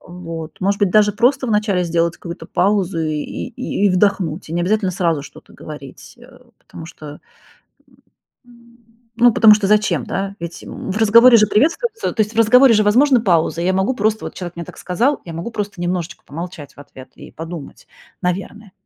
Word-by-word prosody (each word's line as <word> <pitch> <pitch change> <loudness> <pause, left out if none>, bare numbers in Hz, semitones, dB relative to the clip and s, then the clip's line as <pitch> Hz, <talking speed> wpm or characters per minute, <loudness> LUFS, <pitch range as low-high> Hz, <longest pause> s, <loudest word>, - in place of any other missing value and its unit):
Вот. 165 -2 -9
Может 200 +2 0
быть, 200 -2 +2
даже 210 +1 +4
просто 255 +5 +1
в - - -3
начале 210 -4 +1
сделать 170 0 0
какую-то 170 0 -9
паузу 195 -2 0
и 155 -1 -2
и 205 - -3
и - - +3
вдохнуть. 185 -3 0
И - - -8
не 175 - 0
обязательно 200 +1 0
сразу 170 -5 -1
что-то - - -15
говорить. 150 -3 -11
Э, - - -17 0.2
потому 160 - -12
что, 150 -2 -11 1.3
м 235 0 -21 0.4
ну, 240 0 +5
потому 215 -1 +7
что 210 -1 -1
зачем, 200 - +1
да? 195 0 -4
Ведь, 170 0 -7
м, - - -7
в 210 - -3
разговоре 230 +3 +7
же 215 - +4
приветствуются 425 - 0
то 225 - -2
есть 210 +1 -6
в - - -4
разговоре 235 +2 +6
же 215 - +3
возможна 255 +5 +4
пауза. 170 -4 +1
Я 185 +1 +1
могу 190 +7 0
просто, 215 -1 -1
вот - - -8
человек 175 -2 -7
мне 170 - -5
так - - -12
сказал, 240 +11 0
я 170 - -8
могу 170 +8 -5
просто 205 -4 -5
немножечко 175 0 -3
помолчать 165 0 -8
в - - -25
ответ 140 -2 -13
и - - -12
подумать, 165 -2 -9 0.4
наверное. 195 +3 -4
195 Hz, 190 wpm, -18 LUFS, 170-215 Hz, 1.3 s, потому